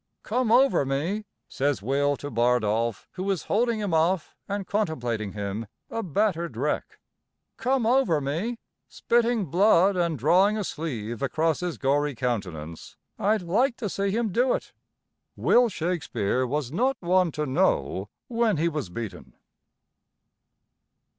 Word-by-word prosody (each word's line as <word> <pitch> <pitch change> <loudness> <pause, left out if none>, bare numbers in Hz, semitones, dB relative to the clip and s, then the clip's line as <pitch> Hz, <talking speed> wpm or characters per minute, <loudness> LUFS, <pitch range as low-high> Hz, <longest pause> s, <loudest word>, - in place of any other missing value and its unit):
"Come 240 0 0
over 260 - +5
me!" 160 +11 -2 0.2
says 140 -6 -1
Will 140 +3 +1
to 145 - -7
Bardolph 115 -2 +1
who 190 +1 -4
is 190 -4 0
holding 230 +1 +1
him 205 -5 -2
off 165 +1 +1
and 200 -1 -2
contemplating 120 - -2
him, 105 +2 -4 0.2
a 230 - -2
battered 170 - -1
wreck. 145 +5 -2 0.6
"Come 255 0 +1
over 245 - +3
me!" 165 - -2 0.3
spitting 235 -3 +1
blood 190 +3 +4
and 170 -3 0
drawing 185 - +4
a 210 - -1
sleeve 120 - -4
across 160 +3 +1
his 180 -2 -3
gory 145 +1 +1
countenance, 90 - -4 0.2
"I'd 210 0 +1
like 230 +9 +1
to 215 -5 -3
see 200 +1 -1
him 220 +1 0
do 245 +6 +2
it!" - - -7 0.6
Will 245 -1 +4
Shakespeare 155 - -1
was 140 -1 -2
not 255 - +1
one 180 -1 +2
to 150 - -2
know 130 - 0 0.2
when 230 -5 +1
he 165 +3 +2
was 150 - -4
beaten. 110 +2 -7
165 Hz, 140 wpm, -26 LUFS, 130-210 Hz, 0.6 s, over